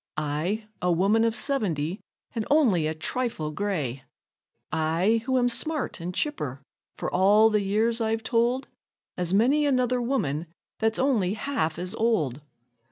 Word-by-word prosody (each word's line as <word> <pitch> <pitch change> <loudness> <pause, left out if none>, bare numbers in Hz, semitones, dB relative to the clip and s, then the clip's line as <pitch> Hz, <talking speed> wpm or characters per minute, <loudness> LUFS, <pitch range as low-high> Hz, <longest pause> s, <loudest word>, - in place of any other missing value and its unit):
I, 155 +9 -2 0.2
a 180 - +2
woman 200 +6 +3
of 230 -1 +1
seventy, 195 - -1 0.3
and 225 - -2
only 225 - +3
a 160 - -2
trifle 160 -2 -2
gray 155 -8 -2 0.7
I, 165 +8 +1
who 260 0 +2
am 245 -1 +3
smart 290 - -1
an' 175 +2 -3
chipper, 150 - -2 0.4
for - - -4
all 205 +4 +5
the 210 -1 +2
years 220 +4 +1
I've 225 0 0
told, 240 +4 +1 0.5
As 180 -1 -1
many 250 +10 +3
another 255 -3 +1
woman 175 - -1 0.3
that's 220 0 +1
only 220 -8 +1
half 220 - -2
as 180 +1 -4
old. 160 - 0
215 Hz, 145 wpm, -26 LUFS, 165-240 Hz, 0.7 s, all